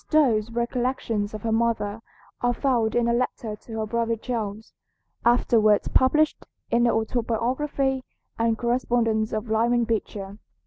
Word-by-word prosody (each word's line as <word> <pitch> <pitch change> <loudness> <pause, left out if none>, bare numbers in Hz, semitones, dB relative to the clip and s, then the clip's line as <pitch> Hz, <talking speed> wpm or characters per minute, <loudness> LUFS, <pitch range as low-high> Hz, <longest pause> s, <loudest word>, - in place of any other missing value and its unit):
Stowe's 240 -9 +3
recollections 235 -3 -1
of 215 - -8
her 225 - -1
mother 225 -2 0 0.4
are 245 0 +1
found 240 -4 +1
in 240 -1 +2
a 235 - +2
letter 235 -3 -2
to 225 +1 -9
her 220 - -1
brother 230 +1 0
Charles, 220 -2 -5 0.5
afterwards 225 -3 +3
published 305 +4 +3 0.3
in 235 +1 +3
the 235 - +4
"Autobiography 255 +4 -1 0.4
and 230 -1 +2
Correspondence 235 -2 +1
of 215 +2 -3
Lyman 235 +2 +2
Beecher." 210 -3 -3
230 Hz, 135 wpm, -25 LUFS, 220-245 Hz, 0.5 s, the